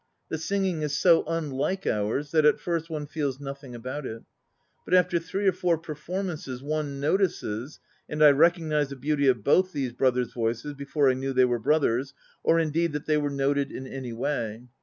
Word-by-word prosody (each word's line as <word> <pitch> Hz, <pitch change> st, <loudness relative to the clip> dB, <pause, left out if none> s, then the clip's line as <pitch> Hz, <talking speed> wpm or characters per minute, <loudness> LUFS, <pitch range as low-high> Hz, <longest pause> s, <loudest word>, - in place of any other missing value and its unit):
The 160 Hz, -, -3 dB
singing 185 Hz, -1 st, -1 dB
is 150 Hz, -1 st, -1 dB
so 170 Hz, +2 st, +5 dB
unlike 165 Hz, +3 st, -2 dB
ours, 110 Hz, +8 st, -1 dB
that 155 Hz, -2 st, +4 dB
at 150 Hz, -, +4 dB
first 170 Hz, -1 st, -2 dB
one 155 Hz, -2 st, -4 dB
feels 145 Hz, -3 st, -3 dB
nothing 135 Hz, -2 st, -8 dB
about 130 Hz, +5 st, -5 dB
it. 115 Hz, -3 st, -7 dB, 0.6 s
But -, -, +2 dB
after 180 Hz, -1 st, +3 dB
three 190 Hz, +4 st, -2 dB
or -, -, +6 dB
four 175 Hz, -2 st, +1 dB
performances 155 Hz, -4 st, -5 dB
one 145 Hz, -1 st, -2 dB
notices, 145 Hz, -, -1 dB, 0.3 s
and 150 Hz, 0 st, +1 dB
I 150 Hz, -, +9 dB
recognized 155 Hz, -1 st, +2 dB
the 140 Hz, -, -6 dB
beauty 140 Hz, +1 st, 0 dB
of 125 Hz, -5 st, +3 dB
both 185 Hz, -, +3 dB
these 130 Hz, -4 st, -2 dB
brothers' 125 Hz, -1 st, +1 dB
voices 120 Hz, +5 st, -2 dB
before 140 Hz, 0 st, +1 dB
I -, -, 0 dB
knew 135 Hz, +1 st, -3 dB
they 130 Hz, 0 st, +5 dB
were 120 Hz, -1 st, 0 dB
brothers, 135 Hz, -1 st, +1 dB, 0.3 s
or, 165 Hz, -, +3 dB
indeed, 165 Hz, 0 st, 0 dB
that 150 Hz, +1 st, -4 dB
they 155 Hz, -1 st, +2 dB
were 145 Hz, -1 st, 0 dB
noted 140 Hz, 0 st, 0 dB
in 130 Hz, -, -6 dB
any 130 Hz, -2 st, -6 dB
way. 115 Hz, -2 st, -3 dB
145 Hz, 190 wpm, -26 LUFS, 130-165 Hz, 0.6 s, I